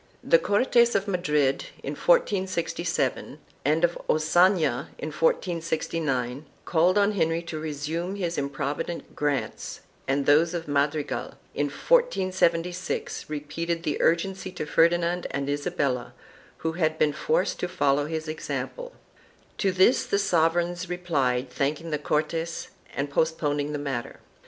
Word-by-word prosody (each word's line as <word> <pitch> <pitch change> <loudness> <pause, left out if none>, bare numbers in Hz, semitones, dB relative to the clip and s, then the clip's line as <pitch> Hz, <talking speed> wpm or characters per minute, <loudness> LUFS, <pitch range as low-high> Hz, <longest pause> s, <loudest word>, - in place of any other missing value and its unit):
4 - - -11
The - - +8
Cortes 235 - +3
of 200 +1 +1
Madrid, 150 -8 +1 0.2
in - - -3
1467, 185 - 0 0.3
and 155 +4 +2
of 175 0 +2
Ocana 155 -3 +3
in 155 - -4
1469, 155 -5 -1 0.2
called 175 +3 +3
on 205 0 +4
Henry 165 -4 0
to 165 -2 -5
resume 160 +4 -3
his 175 -4 -2
improvident 140 +4 -3
grants, 145 -2 -2 0.3
and 140 +1 +1
those 160 +5 +4
of 165 -1 -4
Madrigal, 145 +1 -1 0.2
in 145 - 0
1476, 185 - 0
repeated 165 +3 -3
the 150 - -1
urgency 190 +3 +1
to 175 -4 -5
Ferdinand 170 +3 +2
and 140 0 -3
Isabella, 145 -4 -1 0.4
who 160 - -2
had 160 -2 0
been 150 -2 +2
forced 475 - 0
to 180 - -1
follow 145 -5 +1
his 160 0 -4
example. - - -5 0.7
To 195 - +2
this 185 +7 +4
the 200 - +2
sovereigns 175 -1 +1
replied 140 -8 0
thanking 150 +5 -2
the 150 - 0
Cortes 160 +3 -2 0.3
and 140 - -1
postponing 145 -1 0
the 150 - -2
matter. 135 -5 -4
165 Hz, 130 wpm, -26 LUFS, 145-180 Hz, 0.7 s, The